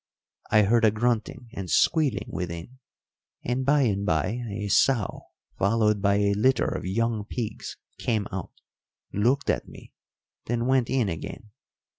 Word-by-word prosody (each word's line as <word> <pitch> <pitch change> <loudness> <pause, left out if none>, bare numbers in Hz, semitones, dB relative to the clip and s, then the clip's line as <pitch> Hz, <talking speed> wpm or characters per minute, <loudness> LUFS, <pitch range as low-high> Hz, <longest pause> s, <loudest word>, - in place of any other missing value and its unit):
I 105 0 +5
heard 115 +4 +3
a 110 - +7
grunting 115 +2 -1
and 95 -2 -6
squealing 140 -11 +2
within, 90 +8 -6 0.6
and 125 +2 -1
by 145 +2 +3
and 100 -5 0
by 100 +5 0
a 105 0 -4
sow, 110 +1 +2 0.3
followed 105 0 +2
by 100 0 +3
a 100 0 +2
litter 130 +6 +2
of - - -3
young 110 +3 0
pigs, 110 0 -5 0.2
came 110 -5 0
out, 95 -2 -5 0.6
looked 125 +7 +2
at - - -3
me, - - -14 0.5
then 120 0 -1
went 130 -2 +2
in 130 -5 +1
again. 95 +5 -6
110 Hz, 145 wpm, -26 LUFS, 100-125 Hz, 0.6 s, a